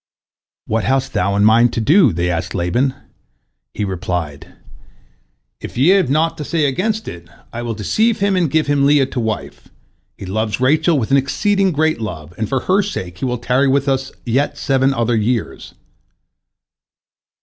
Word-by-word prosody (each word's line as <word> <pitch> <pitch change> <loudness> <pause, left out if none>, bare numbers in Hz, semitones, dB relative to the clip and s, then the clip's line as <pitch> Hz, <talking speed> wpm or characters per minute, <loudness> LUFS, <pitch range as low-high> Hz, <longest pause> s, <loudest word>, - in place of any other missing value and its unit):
"What 110 0 -1
hast 135 +1 0
thou 100 +2 0
in 100 +1 +3
mind 115 +2 +4
to - - -1
do?" 160 - +4
they 85 +1 -1
asked 85 +1 -3
Laban. 120 +10 0 0.8
He 105 - -2
replied: 90 -6 -4 1.1
"If - - -9
ye 135 +7 +4
have 190 -7 +3
naught 155 +4 0
to - - -3
say 155 0 0
against 210 +10 -1
it, 85 -1 -9 0.2
I 120 - -4
will 120 -2 -4
deceive 215 - 0
him 200 -1 +1
and 175 -4 +1
give 160 +2 +1
him 145 -1 +2
Leah 145 -2 +4
to 130 - -5
wife. 110 -2 -4 0.5
He - - -8
loves 110 +3 -2
Rachel 155 +5 +2
with 120 -1 -2
an 140 - +5
exceeding 195 +8 +1
great 155 -4 0
love, 85 -6 -6
and 110 - -3
for 135 -2 -1
her 190 +2 +2
sake 95 - -6
he - - -2
will 125 -1 -1
tarry 125 +3 +1
with 140 +1 +1
us 135 -1 -1
yet 130 +4 0
seven 135 0 +1
other 120 -2 0
years." 115 +1 -2
130 Hz, 175 wpm, -18 LUFS, 110-155 Hz, 1.1 s, an